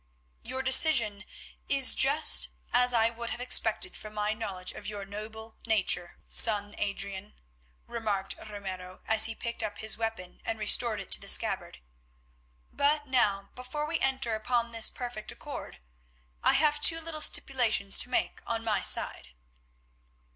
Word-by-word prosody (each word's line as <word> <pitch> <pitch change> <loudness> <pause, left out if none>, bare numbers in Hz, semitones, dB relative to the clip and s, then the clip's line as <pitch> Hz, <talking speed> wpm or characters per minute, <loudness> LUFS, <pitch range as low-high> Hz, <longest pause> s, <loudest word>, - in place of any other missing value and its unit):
"Your 260 +2 -6
decision 240 -7 +3 0.4
is 275 -2 +5
just 285 +4 +4
such - - -16 0.2
as 245 0 +3
I 230 -1 +1
would 235 0 -8
have - - -6
expected 255 +7 +2
from 215 0 -11
my 210 0 -2
knowledge 195 -5 -6
of - - -10
your 205 -2 -7
noble 220 +2 -10
nature, 185 -5 -1
son 205 -2 +7
Adrian," 200 0 -5 0.5
remarked 210 -5 -4 0.2
Ramiro 185 -3 -9
as 220 0 +4
he 225 - -3
picked 235 0 -4
up 210 -2 -6
his 220 0 0
weapon 225 -6 -6
and 225 - -4
restored 215 +1 +3
it 195 - -11
to - - +3
the - - -12
scabbard. - - 0 0.9
"But 295 +1 0
now, 210 -7 -1
before 255 +4 -6
we 320 +1 -4
enter 265 -3 -1
upon 235 +2 -2
this 230 -1 +2
perfect 240 -4 -8
accord, - - -10 0.6
I - - +3
have 295 0 0
two 330 +1 +5
little 320 -1 -7
stipulations 235 -9 +1
to - - +2
make 250 - -3
on 225 -1 -4
my 210 -4 -2
side." 60 - +2
225 Hz, 155 wpm, -27 LUFS, 205-255 Hz, 0.9 s, son